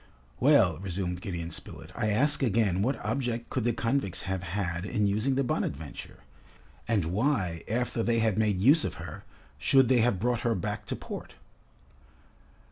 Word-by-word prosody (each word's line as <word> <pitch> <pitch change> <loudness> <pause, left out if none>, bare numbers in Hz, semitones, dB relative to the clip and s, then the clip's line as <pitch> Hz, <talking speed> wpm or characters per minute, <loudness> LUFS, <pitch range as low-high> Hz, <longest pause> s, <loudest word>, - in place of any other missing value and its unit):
"Well," 75 - +4
resumed 90 -1 -3
Gideon 85 -3 -4
Spilett, - - -8
"I 115 -2 0
ask 145 +9 +2
again, 110 -6 +2
what 130 +6 +1
object 120 -4 -2
could 125 -4 -1
the 120 - +3
convicts 115 -4 -1
have 95 -2 -2
had 90 -1 -3
in 105 +1 0
using 110 +7 +1
the 135 - +2
'Bonadventure,' 75 - -4 0.6
and 110 -7 +1
why, 95 - 0
after 120 +1 -1
they 115 +1 +1
had 110 -3 +2
made 105 -3 +1
use 140 - +5
of - - -3
her, - - -9 0.3
should 130 - +4
they 130 -2 +5
have 115 -4 +2
brought 120 +2 +1
her 120 -1 0
back 85 - -4
to - - -2
port?" - - -8
110 Hz, 165 wpm, -28 LUFS, 95-120 Hz, 0.6 s, use